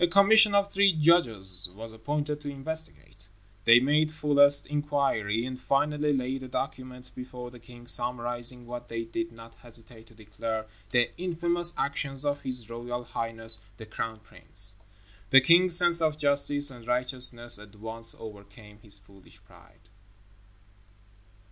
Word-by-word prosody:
A - - +5
commission 200 +3 +6
of 200 0 +2
three 200 -1 +4
judges 115 - +2
was 110 +1 -7
appointed 145 +6 -4
to 145 - -6
investigate. 140 -6 -4 0.4
They 120 +1 +8
made 150 +4 +1
fullest 145 -2 +4
inquiry 140 -7 -1
and 130 0 -7
finally 150 +3 0
laid 130 -1 -2
a 130 - -8
document 130 -1 -6
before 125 -1 -9
the 120 - -14
king 120 0 -15
summarizing 120 0 0
what 120 0 -8
they 115 0 -4
did 170 +10 -5
not 115 0 -14
hesitate 115 -1 -5
to 115 - -20
declare 110 +1 -5 0.2
the 120 -1 +1
"infamous 175 -1 -1
actions 140 0 -3
of 145 0 -1
His 125 -4 -2
Royal 120 +1 -6
Highness, 115 -1 0 0.2
the 110 - -10
Crown 110 +1 -6
Prince." 105 -1 -1 0.5
The 135 - +8
king's 170 +6 +4
sense 175 -1 +4
of 155 -2 0
justice 145 -1 +2
and 120 -2 -14
righteousness 125 -2 +2
at 105 0 -15
once 115 +2 -1
overcame 105 0 -13
his 105 -2 +1
foolish 100 -1 -19
pride. - - -21
125 Hz, 145 wpm, -27 LUFS, 115-150 Hz, 0.5 s, They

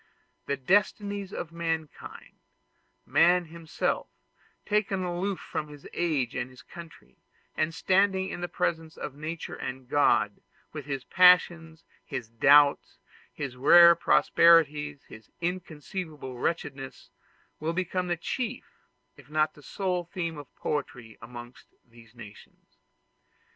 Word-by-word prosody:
The 140 - -1
destinies 200 +5 0
of 170 - -6
mankind 165 -2 -5 0.7
man 175 +1 +4
himself, 165 0 -3 0.6
taken 205 -3 0
aloof 180 +2 -2
from 150 - -5
his 145 -1 -12
age 150 -8 -1
and 130 0 -3
his 130 0 -16
country, 170 -2 -13 0.4
and 155 +1 0
standing 190 +2 +1
in - - -6
the 175 - -2
presence 165 -3 -3
of 130 - -6
Nature 155 +3 -6
and 130 +1 -6
of 125 - -26
God, 145 +1 +2 0.3
with 150 -3 -7
his 135 -2 -3
passions, 170 -2 +4 0.2
his 115 - -6
doubts, 140 +5 +4 0.3
his 135 -3 -6
rare 170 +6 +8
prosperities, 150 -4 +3
and 110 -1 -14
inconceivable 165 -4 -5
wretchedness 135 -1 -4 0.5
will 160 +2 -2
become 185 0 -2
the 175 -1 -1
chief, 245 +7 -4 0.5
if 145 -1 -17
not 155 0 +1
the 150 - -17
sole 180 +2 -2
theme 165 -3 -5
of 145 - -10
poetry 125 -6 -4
amongst 120 0 -11 0.2
these 115 0 -19
nations. 105 -3 -15
160 Hz, 125 wpm, -27 LUFS, 140-175 Hz, 0.7 s, rare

